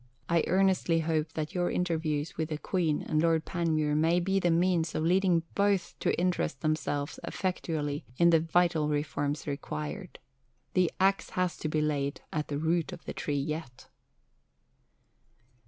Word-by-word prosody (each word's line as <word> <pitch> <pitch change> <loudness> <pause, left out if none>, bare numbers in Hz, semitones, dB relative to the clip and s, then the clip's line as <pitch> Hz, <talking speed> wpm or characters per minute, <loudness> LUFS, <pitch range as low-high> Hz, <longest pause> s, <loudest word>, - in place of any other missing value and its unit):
I 170 -2 +2
earnestly 185 -3 +3
hope 155 -1 -1
that 155 +3 -3
your 175 -2 +1
interviews 160 -4 -1
with 160 0 -2
the 155 - -2
Queen 160 -2 0
and 155 0 +1
Lord 165 -1 +2
Panmure 155 -4 0
may 165 +3 +3
be 195 +2 +1
the 175 - +2
means 170 -1 +2
of 155 - 0
leading 180 -1 +3
both 200 -3 +1
to - - 0
interest 175 -5 0
themselves 155 -1 -1
effectually 155 -6 -2
in 170 0 +5
the 165 - +6
vital 165 -1 +2
reforms 145 0 -1
required. 75 - -5 0.6
The 180 -2 +3
axe 195 +1 +2
has 180 -1 +1
to 155 - -3
be 155 0 +1
laid 145 -1 -1
to 150 - 0
the 145 - -2
root 165 +1 0
of - - -10
the - - -5
tree 145 -1 -2
yet. 150 -2 -5
160 Hz, 155 wpm, -29 LUFS, 150-175 Hz, 0.6 s, the